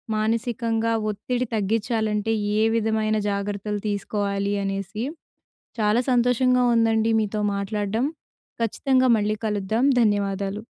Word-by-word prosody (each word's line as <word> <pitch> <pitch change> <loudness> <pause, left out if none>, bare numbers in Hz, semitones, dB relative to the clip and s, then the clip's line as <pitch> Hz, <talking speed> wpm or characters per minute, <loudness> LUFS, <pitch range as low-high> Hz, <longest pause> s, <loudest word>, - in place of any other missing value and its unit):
మానసికంగా 225 +1 0 0.2
ఒత్తిడి 245 +4 -2
తగ్గించాలంటే 220 0 0 0.3
ఏ 215 - +3
విధమైన 220 -1 +1
జాగ్రత్తలు 205 +1 -3
తీసుకోవాలి 200 0 -1
అనేసి. 195 +2 -3 0.8
చాలా 215 +2 +3
సంతోషంగా 250 +1 +3
ఉందండి 225 0 +2
మీతో 215 0 -2
మాట్లాడడం. 205 +4 -1 0.6
ఖచ్చితంగా 260 +3 +2
మళ్ళీ 210 +1 0
కలుద్దాం 215 +4 0 0.2
ధన్యవాదాలు. 200 -1 0
215 Hz, 95 wpm, -24 LUFS, 205-230 Hz, 0.8 s, ఏ